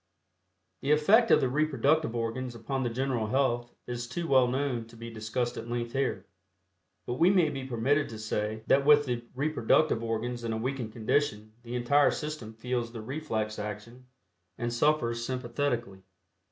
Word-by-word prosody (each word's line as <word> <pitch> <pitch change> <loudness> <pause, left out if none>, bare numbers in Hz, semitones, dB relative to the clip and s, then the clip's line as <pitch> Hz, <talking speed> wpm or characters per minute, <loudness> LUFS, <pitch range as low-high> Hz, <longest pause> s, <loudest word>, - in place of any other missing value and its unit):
The 135 - -3
effect 210 +11 +5
of - - +6
the 130 - +2
reproductive 150 -1 +1
organs 120 +2 -3
upon 130 +4 -3
the 120 - 0
general 125 -2 -1
health 120 -1 0
is 120 0 -4
too 170 +8 -4
well 130 -3 +5
known 125 -3 -1
to 115 - -15
be 115 0 -8
discussed 115 +3 -2
at 115 - -6
length 120 -1 -2
here, 135 0 -1 0.8
but 120 - -4
we 170 - +6
may 180 -5 +4
be 135 -2 -5
permitted 135 +5 +1
to 110 - -7
say 110 0 -3
that 140 - +4
with 145 0 +6
the 120 -2 -2
reproductive 145 -2 +2
organs 115 +1 -3
in 115 -1 -2
a - - -2
weakened 125 -1 -3
condition 110 -2 -1
the 120 +1 -6
entire 135 +4 +4
system 150 -8 -5
feels 120 0 -2
the 115 - -7
reflex 110 -5 -3
action 105 +4 -7 0.5
and 120 0 -2
suffers 120 -3 +1
sympathetically. 120 -4 -2
120 Hz, 165 wpm, -29 LUFS, 115-140 Hz, 0.8 s, of